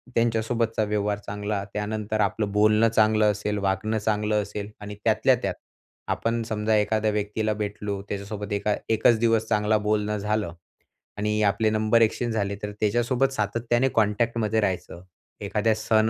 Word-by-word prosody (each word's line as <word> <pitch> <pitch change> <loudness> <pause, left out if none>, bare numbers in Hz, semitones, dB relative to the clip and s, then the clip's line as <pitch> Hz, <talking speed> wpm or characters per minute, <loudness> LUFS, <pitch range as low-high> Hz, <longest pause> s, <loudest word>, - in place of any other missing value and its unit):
त्यांच्यासोबतचा 115 -1 +1
व्यवहार 105 0 -1
चांगला, 105 0 -3
त्यानंतर 105 0 -2
आपलं 100 +1 0
बोलणं 105 +2 +4
चांगलं 110 -1 +3
असेल, 105 0 -3
वागणं 100 +2 0
चांगलं 105 0 0
असेल 100 +1 -6
आणि 105 0 -7
त्यातल्या - - +3
त्यात - - 0 0.6
आपण 115 0 -1
समजा 110 0 +1
एखाद्या 110 +1 +1
व्यक्तीला 105 +1 -1
भेटलो 105 -1 -4
त्याच्यासोबत 100 +1 -5
एका 100 +1 0
एकचं 110 +1 +4
दिवस 115 -1 +2
चांगला 105 0 +2
बोलणं 105 0 0
झालं. 105 -3 -1 0.6
आणि 105 +1 0
आपले 105 +2 +2
नंबर 110 +1 +2
एक्सचेंज 115 +1 +1
झाले 100 -2 -1
तर 105 - -3
त्याच्यासोबत 120 +5 +1
सातत्याने 115 +4 0
कॉन्टॅक्टमध्ये 110 +1 +1
राहायचं. 90 -3 -3 0.4
एखादा 110 +1 +1
सण 110 0 +2
105 Hz, 140 wpm, -25 LUFS, 105-110 Hz, 0.6 s, बोलणं